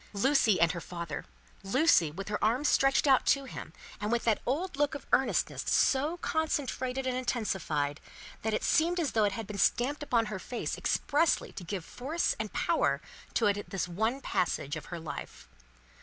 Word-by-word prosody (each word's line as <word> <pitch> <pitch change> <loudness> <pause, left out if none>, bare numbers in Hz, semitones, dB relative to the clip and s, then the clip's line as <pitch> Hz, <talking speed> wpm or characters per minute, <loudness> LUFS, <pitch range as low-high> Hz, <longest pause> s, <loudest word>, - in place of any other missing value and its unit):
Lucie 225 -1 +3
and 170 -1 +4
her 170 - -5
father! 170 -4 -6 0.4
Lucie 195 - +4
with 195 +6 -7
her 205 -1 -2
arms 245 +7 +2
stretched 270 +1 +3
out 270 -2 +5
to 275 -1 +3
him, 265 - -8 0.3
and 210 +1 -2
with 235 0 +1
that 225 -2 +2
old 315 +7 -1
look 290 +1 +1
of 280 - -8
earnestness 265 - +2
so 290 +6 +2
concentrated 270 -6 -1
and 255 -1 0
intensified, 190 - -1 0.4
that 220 - -1
it 215 - -1
seemed 345 +3 +2
as 310 -6 0
though 220 -2 +3
it 200 - 0
had 225 +2 -4
been 200 0 -6
stamped 280 +5 +2
upon 240 -6 +1
her 210 -3 -5
face 240 +5 -4
expressly 300 +3 +1
to 190 - -8
give 175 -1 -5
force 300 +7 -1
and - - -3
power - - +1 0.4
to 225 - +3
it 205 -1 +3
in 205 - -5
this 190 -3 -2
one 220 +9 -1
passage 150 - -1
of 155 -1 -7
her 175 - -6
life. 160 - -8
230 Hz, 185 wpm, -30 LUFS, 195-275 Hz, 0.4 s, out